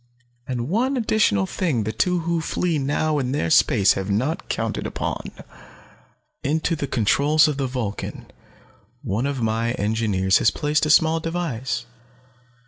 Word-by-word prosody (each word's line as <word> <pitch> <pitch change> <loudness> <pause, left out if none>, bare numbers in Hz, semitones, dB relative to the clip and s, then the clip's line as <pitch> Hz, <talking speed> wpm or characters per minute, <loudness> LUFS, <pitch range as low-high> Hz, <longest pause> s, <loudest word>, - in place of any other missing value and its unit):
And 120 -2 -3
one 250 - 0
additional 210 - +2
thing 135 - -1
the 110 - -2
two 175 - 0
who 170 0 -1
flee 165 0 -1
now 145 +2 0
there 130 +3 -1
in - - -2
space 105 -11 +4
have 95 +1 -4
not 125 +11 -1
counted - - -2
upon. - - -4 1.1
"Into 160 +4 0
the 145 -2 -3
controls 140 +7 +3
of 150 -2 -2
the 135 -2 -1
Vulcan 120 -5 -5 0.8
one 110 +8 -1
of 135 -4 -3
my 115 +1 0
engineers 105 -4 +1
has 110 - +4
placed 150 +5 0
a - - -2
small 160 +1 +4
device. 140 -8 -3
140 Hz, 145 wpm, -22 LUFS, 110-160 Hz, 1.1 s, space